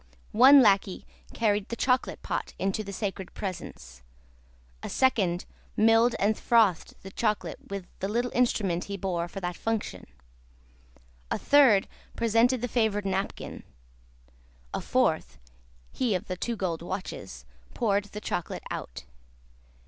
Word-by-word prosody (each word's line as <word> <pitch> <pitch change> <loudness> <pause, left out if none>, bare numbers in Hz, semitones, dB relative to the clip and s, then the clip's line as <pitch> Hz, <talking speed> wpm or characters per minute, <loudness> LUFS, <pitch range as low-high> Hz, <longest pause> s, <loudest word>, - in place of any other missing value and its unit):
One 265 +4 +8
lacquey 195 -3 +2 0.3
carried 210 -3 0
the 235 - -3
chocolate 255 +1 0
pot - - -3
into 195 +3 -1
the 200 - -7
sacred 195 -2 -5
presence; 65 - -7 0.8
a - - -5
second, 195 -10 +1 0.3
milled 225 +2 +5
and 210 +2 +2
frothed 215 -9 +2
the 195 - -9
chocolate 215 0 -1
with 200 -2 -5
the 195 - -2
little 240 +4 -1
instrument 200 -8 +1
he 200 0 -5
bore 175 -3 -2
for 195 - -7
that 175 -1 -3
function; 215 - -3 1.2
a - - 0
third, 265 -9 +5 0.3
presented 230 +2 +2
the 245 - -1
favoured 220 -4 0
napkin; 195 0 -3 1.1
a - - -2
fourth - - 0 0.5
(he 235 -6 0
of 180 - -3
the 185 - -4
two 235 +6 -3
gold 175 -6 -2
watches), 170 - -6 0.3
poured 205 -3 +1
the 210 +1 -8
chocolate 175 - -4
out. - - -6
205 Hz, 135 wpm, -28 LUFS, 185-230 Hz, 1.2 s, One